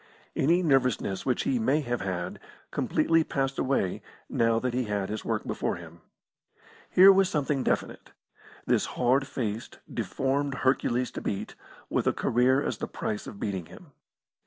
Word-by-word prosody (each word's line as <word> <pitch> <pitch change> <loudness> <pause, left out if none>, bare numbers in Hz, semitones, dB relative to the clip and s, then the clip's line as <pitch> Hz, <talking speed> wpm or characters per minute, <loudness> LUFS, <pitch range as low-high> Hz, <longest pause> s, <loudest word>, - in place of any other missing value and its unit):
Any 170 +6 +3
nervousness 125 - +1
which 125 - +1
he 265 -2 +1
may 155 -9 +2
have 120 -3 -2
had 90 -3 -3 0.3
completely 165 0 +2
passed 135 -3 -2
away 130 -9 0 0.3
now 115 0 +2
that 125 +1 -1
he 125 0 0
had 100 -2 -2
his 110 0 -4
work - - -2
before - - -2
him. 85 -1 -12 0.9
Here 190 +2 +8
was 195 -1 +3
something 145 -3 0
definite - - -2 0.6
this - - +2
hard 130 +2 +3
faced, 115 -4 -4 0.2
deformed 140 +1 -1
Hercules 125 -1 +1
to - - -6
beat, 100 - -3 0.3
with - - 0
a - - +3
career 130 +4 +2
as - - -3
the - - -3
price 105 - -4
of 100 - -9
beating 95 -6 -3
him. 165 -5 -14
125 Hz, 160 wpm, -28 LUFS, 105-140 Hz, 0.9 s, Here